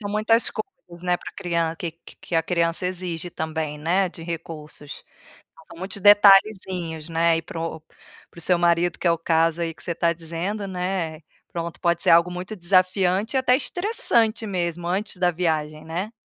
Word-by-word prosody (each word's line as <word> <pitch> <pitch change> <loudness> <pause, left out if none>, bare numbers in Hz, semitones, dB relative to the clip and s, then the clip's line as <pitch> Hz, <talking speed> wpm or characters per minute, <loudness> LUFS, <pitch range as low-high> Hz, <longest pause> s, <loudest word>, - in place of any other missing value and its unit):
são 205 -1 -5
muitas 220 +2 +2
coisas, 180 - -9
né, 180 -1 +1
pra - - -10
crian 170 -3 -1
que 165 -1 -5
que 165 - -17
que - - -7
a 165 - +3
criança 170 +1 0
exige 180 -2 -4
também, 160 -2 -4
né, 180 +5 +1
de 170 -1 -10
recursos. 160 -3 -7 0.6
São - - -13
muitos 195 +2 -6
detalhezinhos, 195 -5 +4
né, 165 0 +2
e 165 - -5
pro 165 -1 -6 0.5
para - - -16
o - - -7
seu 175 +1 +3
marido 170 0 +2
que - - -4
é - - +6
o 170 - +1
caso 165 0 +1
aí 165 -1 -3
que - - -14
você 170 - -3
tá 170 0 +1
dizendo, 170 +5 -4
né, 180 -4 -3 0.3
pronto, 170 -1 -5
pode 170 -1 +1
ser - - +3
algo 170 +1 +6
muito 180 +4 -6
desafiante 185 +4 +2
e - - +5
até 255 -1 +4
estressante 265 - +2
mesmo 175 -3 -2
antes 190 +3 -2
da 180 -1 +2
viagem, 155 -3 -2
né. 175 +6 -4
175 Hz, 185 wpm, -23 LUFS, 165-190 Hz, 0.6 s, é